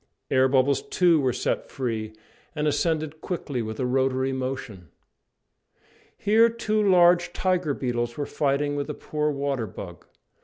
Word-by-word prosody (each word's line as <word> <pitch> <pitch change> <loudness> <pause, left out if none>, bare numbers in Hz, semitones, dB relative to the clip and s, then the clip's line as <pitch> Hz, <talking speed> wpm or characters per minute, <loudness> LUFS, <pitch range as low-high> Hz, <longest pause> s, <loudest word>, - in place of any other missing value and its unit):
Air 130 0 +4
bubbles, 135 +1 +2
too, 175 -3 +3
were 130 -2 +2
set - - -2
free, 115 -5 -3 0.4
and 150 0 0
ascended 155 0 -1
quickly 145 -8 -3
with 110 0 -5
a 130 - 0
rotary 130 +1 +1
motion. 130 - -5 1.3
Here 225 +3 +4
two 220 -2 -1
large 175 -3 +4
tiger 180 -6 0
beetles 120 -2 -2
were 145 - -2
fighting 145 0 0
with 145 +1 -3
a 150 - -4
poor 150 0 -2
water 140 -5 -2
bug. 90 -2 -10
140 Hz, 145 wpm, -25 LUFS, 130-165 Hz, 1.3 s, Air